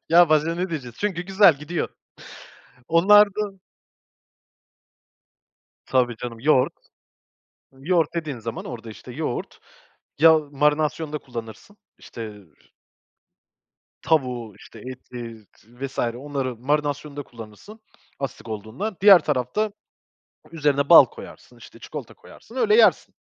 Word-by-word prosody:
Ya 170 0 +7
başka 155 +2 +2
ne 180 +2 -3
diyeceğiz? 125 -7 -6
Çünkü 190 -4 -2
güzel, 190 -4 +5
gidiyor. 160 +4 -3 1.0
Onlarda 200 +3 +4 2.3
Tabii 125 -2 +1
canım. 120 -2 -7
Yoğurt 130 0 +3 1.0
yoğurt 160 +4 0
dediğin 155 -6 -4
zaman 115 0 -6
orada, 115 -2 -8
işte, 105 - -11
yoğurt - - -5 0.6
ya 160 +1 +7
marinasyonda 150 +1 -1
kullanırsın, 115 - -10 0.2
işte 110 -3 -9 1.6
tavuğu, 125 -9 -1
işte 115 - -14
eti 120 -2 -9
z - - -26
vs. 135 0 -5
onların 130 0 -3
marinasyonunda 145 +1 -2
kullanırsın, 115 - -13 0.4
asidik 135 -4 -6
olduğundan. 110 - -5
Diğer 195 -2 +9
tarafta 150 - -1 0.8
üzerine 145 -3 0
bal 170 - +10
koyarsın, 460 +1 -13
işte, - - -15
çikolata - - -9
koyarsın, - - -16
öyle 435 -2 +3
yersin. - - +4
145 Hz, 105 wpm, -23 LUFS, 120-170 Hz, 2.3 s, bal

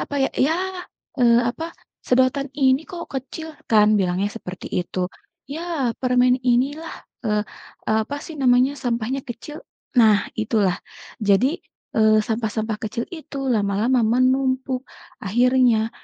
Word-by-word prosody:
apa - - -5
ya, - - +1 0.2
ya, 310 - +2 0.7
eee, 235 -1 +6
apa, 325 +6 -6 0.3
"Sedotan 260 +2 +2
ini 265 -1 +3
kok 345 -2 -7
kecil?" 270 +5 -5 0.2
Kan 215 -1 +5
bilangnya 185 +2 0
seperti 180 -4 -8
itu. 180 0 -2 0.4
"Yah, 315 -6 -2
permen 250 -1 +3
inilah" 275 +6 +1 0.3
eee 210 -1 +1 0.5
eee, 220 0 +3
apa 285 +6 -5
sih 320 - -8
namanya, 250 +1 +4
sampahnya 240 +2 -1
kecil, 270 +6 -8 0.4
nah 215 -3 +6 0.2
itulah. 210 -4 +1 0.5
Jadi, 260 - +3 0.4
eee, 215 -1 +5
sampah-sampah 220 -1 -2
kecil 230 +2 -3
itu 310 -4 -7 0.2
lama-lama 210 +4 +2
menumpuk 260 +2 +1 0.4
akhirnya, 240 +1 +3
245 Hz, 125 wpm, -22 LUFS, 220-265 Hz, 0.7 s, eee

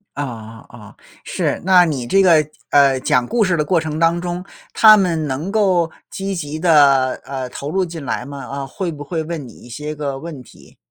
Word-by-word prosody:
哦， 115 -5 -7
哦， 105 -3 -14 0.3
是。 - - -2
那 185 -1 +6
你 140 -8 -2
这 195 +9 +3
个， 185 -3 +5 0.4
呃， 140 -2 +5
讲 125 -1 +1
故 235 - +1
事 185 -3 +1
的 150 - 0
过 170 +3 +2
程 155 -1 -4
当 165 +1 +2
中， 175 0 -4 0.3
他 215 -1 +8
们 170 -6 0
能 145 +8 -4
够 190 -6 +2 0.2
积 195 0 -4
极 155 -4 -5
地， 170 +2 -1 0.6
呃， 130 -2 -5
投 140 +3 -6
入 190 +4 0
进 165 -4 -8
来 125 - -3
吗？ 140 0 -8
啊， 140 0 -5
会 185 +6 -4
不 145 -2 -8
会 160 +2 -3
问 160 -3 -6
你 120 - -12
一 - - -16
些 150 +6 -6
个 145 -3 -4
问 160 -3 -8
题？ 125 - -18
155 Hz, 220 characters per minute, -19 LUFS, 135-175 Hz, 0.6 s, 他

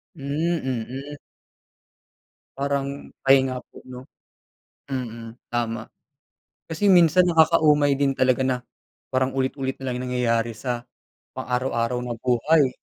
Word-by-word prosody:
Hmm, 155 +4 -1
mm. 130 +3 -4 1.4
Parang 140 0 -3
pahinga 135 -1 +3
po, - - -15
'no? 125 0 -9 0.8
Mm, 115 -4 -5 0.2
tama. 115 -2 -3 0.7
Kasi 165 +5 -1
minsan 180 -1 +6
nakakaumay 155 -3 +4
din 135 -1 +2
talaga 130 0 +2
na 130 -1 0 0.5
parang 130 +1 0
ulit-ulit 130 0 -1
nalang 125 -1 -2
nangyayari 115 -2 0
sa 120 0 -4 0.5
pang - - -7
araw-araw 125 -1 0
na 120 - -3
buhay. 130 +4 +3
130 Hz, 110 wpm, -24 LUFS, 125-145 Hz, 1.4 s, minsan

